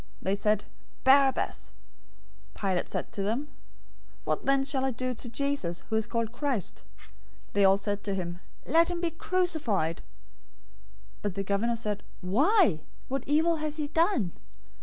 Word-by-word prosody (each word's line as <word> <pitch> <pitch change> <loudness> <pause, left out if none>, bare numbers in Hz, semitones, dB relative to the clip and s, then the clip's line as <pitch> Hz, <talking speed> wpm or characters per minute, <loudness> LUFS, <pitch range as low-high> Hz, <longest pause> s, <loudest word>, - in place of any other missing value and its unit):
They 190 - 0
said, 210 0 +1 0.4
"Barabbas!" 270 0 +3 0.8
027:022 - - -13
Pilate 190 -3 0
said - - -3
to 200 - -3
them, 235 +9 -1 0.7
"What - - -2
then 275 0 +4
shall 270 -1 0
I 265 - +2
do 255 +1 -2
to 240 0 -7
Jesus, 275 -10 -2
who - - +2
is 220 -1 +1
called 230 -2 -1
Christ?" 250 -5 -2 0.7
They 200 - +3
all 195 0 +6
said 205 0 -2
to 200 -2 -1
him, 175 -2 -4 0.3
"Let 330 +1 +4
him 350 -1 -2
be 340 -1 0
crucified!" 315 - 0 1.2
027:023 - - -28
But 205 -3 -2
the 195 - -1
governor 205 +4 +1
said, 210 -3 -1 0.2
"Why? 220 - +3 0.3
What 270 0 -1
evil 320 +3 +3
has 305 0 -3
he 295 -2 -2
done?" 325 - +2
240 Hz, 160 wpm, -29 LUFS, 200-295 Hz, 1.2 s, all